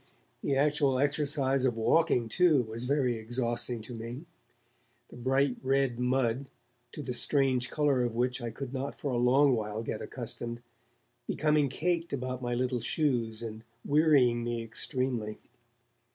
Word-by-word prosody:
The 140 - 0
actual 145 -1 +2
exercise 140 -1 +1
of 125 -3 +1
walking, 125 0 +2
too, 155 +1 +3
was 115 +2 -5
very 130 -3 +1
exhausting 120 +1 -1
to 115 +3 -8
me; 120 +6 -7 0.8
the - - -13
bright 130 +2 +1
red 135 -2 +1
mud, 125 +1 0 0.5
to 150 - -6
the 125 - -3
strange 130 -1 +2
colour 145 -4 +1
of 120 -2 -1
which 125 +2 0
I 120 - -3
could 130 +3 -7
not 135 +1 -3
for 140 - -4
a 120 - 0
long 130 +3 +4
while 110 -1 -2
get - - -4
accustomed, 120 0 -4 0.6
becoming 150 -2 +2
caked 170 +4 -1
about 130 -1 -3
my 120 -1 -2
little 125 -1 -1
shoes, 120 -8 0
and 110 -1 -7 0.2
wearying 140 -6 +4
me 120 -1 -2
extremely. 115 -1 -2
130 Hz, 150 wpm, -30 LUFS, 120-140 Hz, 0.8 s, long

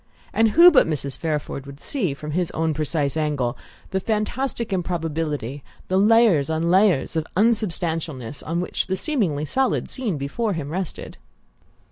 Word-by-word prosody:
And 225 0 +4
who 350 +1 +10
but 290 - +5
Mrs. 140 -4 -3
Fairford 150 -3 -3
would 140 0 -10
see, 185 - -1
from 150 +1 -7
his 175 +2 0
own 160 0 0
precise 150 -1 -1
angle, 145 -6 -1 0.4
the 190 - 0
fantastic 225 +3 -2
improbability, 160 -7 -3 0.3
the 185 +1 +3
layers 210 -9 +4
on 160 +2 0
layers 185 -6 +3
of 160 -1 -1
unsubstantialness, 165 - 0
on 170 +2 -2
which 180 - -2
the 190 0 -1
seemingly 185 - -1
solid 260 - 0
scene 230 - -2
before 200 +11 -2
him 150 -4 -4
rested? 185 0 -5
165 Hz, 150 wpm, -23 LUFS, 150-210 Hz, 0.4 s, who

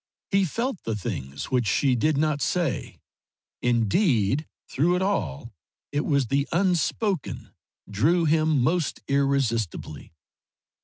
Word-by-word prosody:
He 195 -1 +3
felt 230 - -3
the 115 - -3
things 70 - -5
which 125 -3 +1
she 130 +5 +2
did 150 +5 +1
not 150 -1 +1
say; 170 -7 -1 0.6
indeed 120 - +2 0.2
through 170 +7 +1
it 180 - 0
all 110 - -2 0.4
it 145 +1 -1
was 140 -4 +2
the 140 +4 0
unspoken 180 0 0 0.4
drew 155 - +2
him 155 -3 +2
most 160 +3 0
irresistibly. 125 - -1
140 Hz, 115 wpm, -25 LUFS, 115-170 Hz, 0.6 s, He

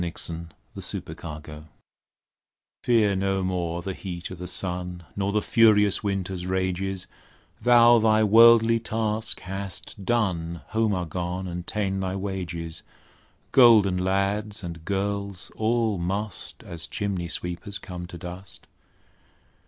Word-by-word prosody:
William 85 -1 -3 0.3
Shakespeare - - -3 0.3
Fear - - -15
No 75 -1 -9
More 75 - -15 1.1
Fear 110 -5 +3
no 95 0 0
more 85 -2 -2
the 95 - -3
heat 90 -2 -6
o' - - -4
the 90 0 -7
sun; 90 0 -3
Nor 100 0 -1
the 105 0 +1
furious 105 -4 +4
winter's 95 -2 -2
rages, 95 0 -1 0.6
Thou 120 0 +7
thy 110 0 +4
worldly 115 +1 +7
task 110 0 -1
hast 95 +1 -5
done, 90 -7 0
Home 110 -2 +1
art 90 -2 -3
gone, 90 +2 -3
and 90 0 -6
ta'en 95 -3 -1
thy 95 0 -2
wages; 90 -4 -4 0.7
Golden 110 -7 +6
lads 100 +3 0
and 85 -2 -7
girls 100 -1 -2
all 110 -2 +1
must, 100 +4 -4
As 85 -2 -6
chimney 95 -4 -2
sweepers 90 +4 -2
come 90 -2 -8
to 90 - -9
dust. 90 +3 -8
95 Hz, 130 wpm, -25 LUFS, 90-105 Hz, 1.1 s, Thou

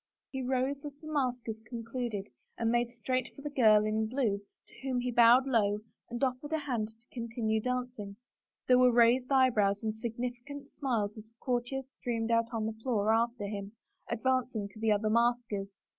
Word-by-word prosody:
He 265 - -3
rose 260 +2 -1
as 290 -2 -7
the 310 0 -8
maskers 245 -5 -1
concluded 230 - -4 0.3
and 230 -1 +1
made 240 0 +2
straight 255 +2 -2
for 280 - -11
the 295 - -4
girl 215 -6 +5
in 215 +1 0
blue 220 -5 0 0.2
to - - -18
whom 260 -2 -1
he 245 0 -1
bowed 240 +2 +7
low 210 -5 +2 0.3
and 240 0 -4
oflFered 270 +4 -1
his 315 -2 0
hand 240 -6 -1
to 225 +2 -20
continue 230 -2 -1
dancing. 245 -5 -3 0.5
There 250 0 +6
were 250 0 +6
raised 240 +2 +4
eyebrows 220 -7 +3
and 220 -1 0
sig 225 +1 -5
nificant 250 +4 -5
smiles 225 -7 -1
as 215 - -11
the 225 +1 -25
courtiers 250 +1 -2
streamed 230 -1 -1
out 230 0 +2
on 225 -2 -1
the 220 - -2
floor 220 -3 +2
after 235 -1 +1
him, 200 0 -5 0.4
advancing 250 -3 0
to 210 - -14
the 220 -1 +2
other 215 +1 +2
maskers. 235 -4 +1
235 Hz, 185 wpm, -31 LUFS, 220-255 Hz, 0.5 s, bowed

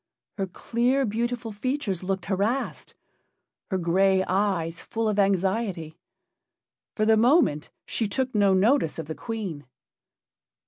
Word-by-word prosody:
Her 195 - 0
clear, 245 +8 0
beautiful 235 +1 -2
features 210 - -2
looked 190 0 -2
harassed; 205 +7 -2 0.7
her 190 - 0
gray 190 +2 +3
eyes 185 -4 -1
full 225 0 -2
of 210 -1 0
anxiety. 190 -4 0 1.0
For 215 - +1
the 220 0 +5
moment 235 - +3 0.2
she 225 - -2
took 260 +5 -2
no 200 -3 +4
notice 205 - +2
of 165 - -4
the 160 - -5
Queen. 195 -9 -5
200 Hz, 125 wpm, -26 LUFS, 185-230 Hz, 1.0 s, the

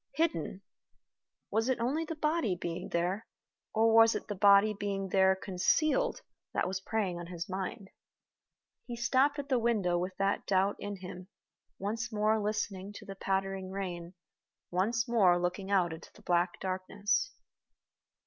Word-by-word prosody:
Hidden! 200 - -1 0.9
Was 225 +3 +1
it 260 - +1
only 275 +8 0
the 325 - -5
body 305 - +1
being 170 +1 -4
there, 180 +6 -1 0.4
or 225 0 +3
was 225 0 +7
it - - -4
the - - -1
body 200 +2 +6
being 195 -1 -3
there 190 0 +4
concealed, 305 - +1 0.3
that - - +1
was 185 0 -2
preying 190 -4 -1
on 175 - -7
his 175 +1 -5
mind? 190 +1 -5 1.0
He 240 - -4
stopped 260 +4 +2
at 285 -1 -4
the 255 -3 +3
window 205 -7 +1
with 185 +1 -4
that 195 0 0
doubt 195 +1 +2
in 205 -2 -6
him, 180 0 -8 0.5
once 225 +5 -3
more 215 0 +2
listening 205 -2 -3
to 210 - -10
the 195 - -6
pattering 195 0 -2
rain, 180 -2 -5 0.6
once 220 +6 +1
more 200 -7 +4
looking 180 +2 -2
out 180 -4 +2
into 160 - -10
the - - -17
black 175 0 +1
darkness. 200 - -1
200 Hz, 155 wpm, -31 LUFS, 185-225 Hz, 1.0 s, was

